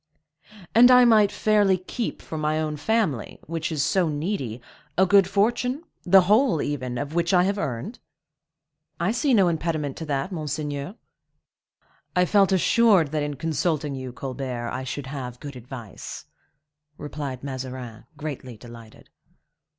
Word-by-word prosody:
"And 245 Hz, +2 st, +8 dB
I 250 Hz, -1 st, +8 dB
might 215 Hz, -4 st, +5 dB
fairly 205 Hz, -3 st, +3 dB
keep 210 Hz, +5 st, -5 dB
for -, -, -7 dB
my 155 Hz, 0 st, 0 dB
own 155 Hz, -1 st, -2 dB
family, 155 Hz, -, -1 dB
which 165 Hz, 0 st, -3 dB
is 150 Hz, -3 st, 0 dB
so 185 Hz, -4 st, +2 dB
needy, 145 Hz, -, -3 dB, 0.4 s
a 190 Hz, -, +5 dB
good 195 Hz, 0 st, +5 dB
fortune,—the 215 Hz, -, +2 dB
whole, 210 Hz, -, +3 dB
even, 130 Hz, -4 st, -3 dB
of 145 Hz, +4 st, -4 dB
which 170 Hz, +2 st, +1 dB
I 180 Hz, -, +5 dB
have 200 Hz, +2 st, 0 dB
earned?" 140 Hz, -, -4 dB, 1.0 s
"I 175 Hz, +5 st, +1 dB
see 250 Hz, +2 st, +2 dB
no 195 Hz, -4 st, +5 dB
impediment 160 Hz, -4 st, -1 dB
to 160 Hz, -, -5 dB
that, 145 Hz, +5 st, -2 dB
monseigneur." 150 Hz, 0 st, -4 dB, 1.2 s
"I 180 Hz, 0 st, +4 dB
felt 195 Hz, +1 st, +3 dB
assured 190 Hz, -4 st, +4 dB
that 155 Hz, -1 st, -1 dB
in 145 Hz, 0 st, -3 dB
consulting 155 Hz, -1 st, -1 dB
you, 130 Hz, -1 st, -6 dB
Colbert, 125 Hz, -2 st, -5 dB
I 130 Hz, +1 st, -4 dB
should 135 Hz, +2 st, -5 dB
have 130 Hz, -3 st, -6 dB
good 145 Hz, -2 st, -8 dB
advice," 120 Hz, -4 st, -9 dB, 0.7 s
replied 140 Hz, -3 st, -6 dB
Mazarin, 130 Hz, -4 st, -6 dB
greatly 135 Hz, -5 st, -6 dB
delighted. 115 Hz, -1 st, -13 dB
155 Hz, 145 wpm, -24 LUFS, 135-195 Hz, 1.2 s, And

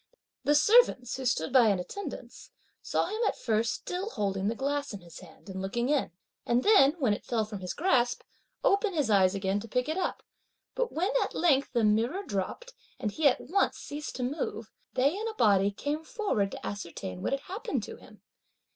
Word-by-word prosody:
The 295 Hz, -, +3 dB
servants, 310 Hz, -, +4 dB
who 265 Hz, -, -6 dB
stood 160 Hz, -5 st, 0 dB
by 250 Hz, -4 st, +7 dB
in 200 Hz, -2 st, +3 dB
attendance, 400 Hz, -, -7 dB, 0.3 s
saw -, -, 0 dB
him 435 Hz, +2 st, -3 dB
at -, -, -1 dB
first 220 Hz, -1 st, 0 dB
still 370 Hz, +4 st, -4 dB
holding 195 Hz, -, -1 dB
the 225 Hz, -, 0 dB
glass 280 Hz, -1 st, -2 dB
in 195 Hz, -, -9 dB
his 170 Hz, -1 st, -12 dB
hand 175 Hz, +1 st, -16 dB
and 190 Hz, -1 st, -5 dB
looking 235 Hz, +6 st, -1 dB
in, 290 Hz, -2 st, +1 dB, 0.3 s
and 240 Hz, +1 st, +1 dB
then, 330 Hz, -9 st, +6 dB
when 255 Hz, -9 st, +2 dB
it -, -, -5 dB
fell 225 Hz, -3 st, 0 dB
from 210 Hz, -2 st, -7 dB
his 180 Hz, -1 st, -5 dB
grasp, 255 Hz, -8 st, +2 dB, 0.4 s
open 400 Hz, 0 st, +2 dB
his 285 Hz, -8 st, +1 dB
eyes 190 Hz, -1 st, +4 dB
again 195 Hz, +1 st, 0 dB
to 225 Hz, -, -8 dB
pick 250 Hz, +4 st, -1 dB
it 315 Hz, +3 st, -2 dB
up, 360 Hz, -, -2 dB, 0.5 s
but -, -, -1 dB
when 360 Hz, +7 st, 0 dB
at -, -, -2 dB
length 285 Hz, -5 st, +2 dB
the 235 Hz, -2 st, +2 dB
mirror 230 Hz, -, +2 dB
dropped, 395 Hz, -, -4 dB, 0.3 s
and 215 Hz, -5 st, -2 dB
he 310 Hz, +6 st, +3 dB
at 255 Hz, -, +2 dB
once 380 Hz, +8 st, +1 dB
ceased 295 Hz, +1 st, -6 dB
to 255 Hz, -, -3 dB
move, 245 Hz, -5 st, -3 dB, 0.2 s
they 275 Hz, +6 st, +2 dB
in 435 Hz, +3 st, -3 dB
a 445 Hz, -, -5 dB
body 200 Hz, -, +4 dB
came 290 Hz, +9 st, -3 dB
forward 320 Hz, -, -1 dB
to -, -, -7 dB
ascertain 170 Hz, -, -6 dB
what -, -, -1 dB
had 275 Hz, -, -1 dB
happened 385 Hz, +8 st, -4 dB
to -, -, -8 dB
him. -, -, -17 dB
250 Hz, 205 wpm, -29 LUFS, 205-320 Hz, 0.5 s, by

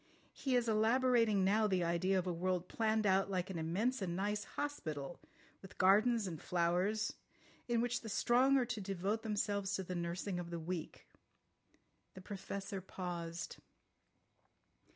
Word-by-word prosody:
He 265 Hz, -2 st, -1 dB
is 240 Hz, -1 st, +2 dB
elaborating 225 Hz, -1 st, +3 dB
now 215 Hz, +2 st, +3 dB
the 185 Hz, -3 st, +1 dB
idea 170 Hz, +3 st, +1 dB
of 185 Hz, -, 0 dB
a 180 Hz, -, -1 dB
world 180 Hz, +1 st, -1 dB
planned 220 Hz, -1 st, +1 dB
out 195 Hz, 0 st, +3 dB
like 185 Hz, -1 st, -1 dB
an 170 Hz, -, -4 dB
immense 205 Hz, +10 st, 0 dB
and 175 Hz, -3 st, -2 dB
nice 205 Hz, +2 st, -1 dB
hospital, 160 Hz, -, -4 dB, 0.4 s
with 190 Hz, -, -13 dB
gardens 215 Hz, +4 st, +4 dB
and 165 Hz, -5 st, -5 dB
flowers, 180 Hz, +5 st, +1 dB, 0.5 s
in 235 Hz, -1 st, +2 dB
which 245 Hz, 0 st, 0 dB
the 225 Hz, -, -7 dB
strong 255 Hz, +6 st, +4 dB
are 255 Hz, -, +2 dB
to 225 Hz, -3 st, -4 dB
devote 195 Hz, +3 st, -1 dB
themselves 205 Hz, -2 st, -1 dB
to 190 Hz, -, -2 dB
the 185 Hz, -, -5 dB
nursing 175 Hz, +2 st, -2 dB
of 175 Hz, -1 st, -5 dB
the 170 Hz, -1 st, -4 dB
weak." 165 Hz, 0 st, -5 dB, 1.1 s
The 190 Hz, -, -9 dB
Professor 195 Hz, 0 st, -5 dB
paused. 175 Hz, -2 st, -5 dB
195 Hz, 150 wpm, -36 LUFS, 180-220 Hz, 1.1 s, gardens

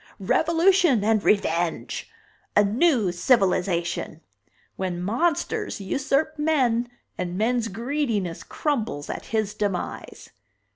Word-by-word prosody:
Revolution 335 Hz, -, +3 dB
and 215 Hz, -1 st, +2 dB
Revenge! 170 Hz, -5 st, 0 dB, 0.5 s
A 205 Hz, -, +7 dB
new 225 Hz, -, +2 dB
civilization! 175 Hz, -5 st, +1 dB, 0.5 s
When 185 Hz, -2 st, -3 dB
monsters 245 Hz, -, -1 dB
usurp 275 Hz, +8 st, -1 dB
men 250 Hz, -6 st, +1 dB, 0.3 s
and 180 Hz, 0 st, -3 dB
men's 230 Hz, +2 st, +1 dB
greediness 225 Hz, -, -2 dB
crumbles 225 Hz, -, -2 dB
at -, -, -6 dB
his 215 Hz, -2 st, -1 dB
demise!" 200 Hz, -4 st, -4 dB
220 Hz, 95 wpm, -24 LUFS, 185-280 Hz, 0.5 s, A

